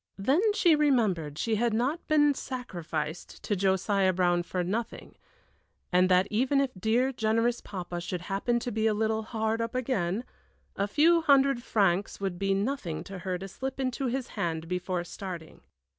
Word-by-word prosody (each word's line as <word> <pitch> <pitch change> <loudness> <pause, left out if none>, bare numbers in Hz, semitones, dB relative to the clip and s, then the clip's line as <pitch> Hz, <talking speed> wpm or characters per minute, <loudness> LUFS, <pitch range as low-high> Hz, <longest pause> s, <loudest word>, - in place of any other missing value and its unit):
Then 265 - +2
she 340 -6 +5
remembered 215 - +1
she 225 +4 0
had 235 0 +1
not 265 +9 -1
been 295 -2 +4
sacrificed 170 - -5
to 205 - 0
Josiah 190 0 +2
Brown 175 -1 +2
for 180 +1 -3
nothing, 220 +6 -4 0.8
and 180 +1 +4
that 180 +1 +4
even 260 +6 +2
if 275 -2 +1
dear, 230 +7 +1
generous 230 0 +1
papa 175 -3 -6
should 175 0 -4
happen 200 +6 -1
to 245 - -3
be 220 0 +1
a 215 - +2
little 220 +1 0
hard 220 0 -2
up 230 +1 -3
again, 230 -5 -1 0.5
a 200 - 0
few 330 +9 +4
hundred 275 -4 +4
francs 195 -4 +1
would 190 -3 -3
be 195 0 +1
nothing 200 - -2
to 195 -1 -8
her 180 0 -3
to 195 +2 -7
slip 265 +7 -6
into 260 0 -1
his 255 +1 -2
hand 165 -1 -3
before 180 0 -2
starting. 175 -2 -8
210 Hz, 170 wpm, -28 LUFS, 180-250 Hz, 0.8 s, she